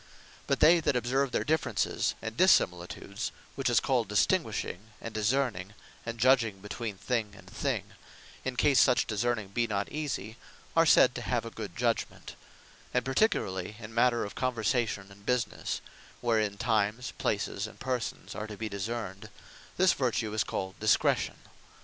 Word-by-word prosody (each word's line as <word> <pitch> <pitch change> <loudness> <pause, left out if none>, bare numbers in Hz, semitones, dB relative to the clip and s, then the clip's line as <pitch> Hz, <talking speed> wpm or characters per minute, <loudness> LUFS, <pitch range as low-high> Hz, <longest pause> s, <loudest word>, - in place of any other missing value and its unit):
But 140 - +1
they 170 +3 +7
that 145 - +1
observe 130 +2 +1
their - - 0
differences, 130 -10 0
and 110 0 -4
dissimilitudes; 100 - +2 0.2
which 135 -2 0
is 120 -3 +5
called 125 -4 +1
Distinguishing, 105 0 0
and 115 - -7
Discerning, 110 -3 0 0.3
and 115 0 -3
Judging 115 -4 +3
between 105 +1 -5
thing 105 0 -2
and - - -15
thing; - - -2 0.6
in 130 -1 -3
case, 135 +2 +4
such 125 -2 +5
discerning 110 -1 -1
be 115 +4 0
not 100 -2 -2
easie, 130 -7 -4 0.4
are 165 0 +5
said 130 -3 +6
to 125 - -5
have 120 -1 -1
a 115 - -6
Good 105 -6 -7
Judgement: 115 -1 -2 0.6
and 125 - +2
particularly 105 - 0
in 110 -1 -9
matter 120 0 +3
of 100 - -7
conversation 115 -4 -1
and 100 +1 -16
businesse; 125 +1 -1 0.4
wherein, 110 -4 +1
times, 110 +1 0
places, 105 0 -1
and - - -14
persons 125 -3 -3
are 105 0 -5
to 105 -1 -8
be 110 0 -3
discerned, 100 0 -4 0.5
this 185 0 +5
Vertue 120 -4 -1
is 110 - +2
called 95 0 -4
DISCRETION. 110 0 +2
115 Hz, 155 wpm, -30 LUFS, 105-125 Hz, 0.6 s, they